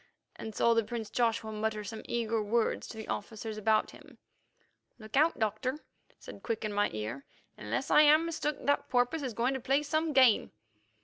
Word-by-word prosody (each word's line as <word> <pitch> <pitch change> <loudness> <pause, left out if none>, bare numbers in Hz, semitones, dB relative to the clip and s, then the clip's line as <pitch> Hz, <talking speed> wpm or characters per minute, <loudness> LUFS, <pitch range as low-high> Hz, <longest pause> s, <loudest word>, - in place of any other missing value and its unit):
and 220 -2 -8
saw 235 - +3
the 230 0 +2
prince 225 0 -6
Joshua 225 -2 0
mutter 215 0 -2
some 220 +1 -7
eager 230 -1 -1
words 220 +2 0
to 220 - -9
the 220 - -7
officers 220 0 -5
about 215 0 +1
him. - - -16 0.8
"Look 215 0 -9
out, 310 +4 +3
Doctor," 220 +5 -1 0.4
said - - -11
Quick 225 -1 -3
into 210 - -3
my 205 0 +2
ear. 110 +6 -5 0.3
"Unless 115 +5 -3
I'm 305 +2 +6
mistook, 305 -3 -3
that 285 0 +1
porpoise 250 +5 +1
is 255 -5 -4
going 245 +3 +1
to 265 - -3
play 270 +4 +1
some 310 +2 0
game." 260 -6 +4
230 Hz, 180 wpm, -30 LUFS, 215-270 Hz, 0.8 s, I'm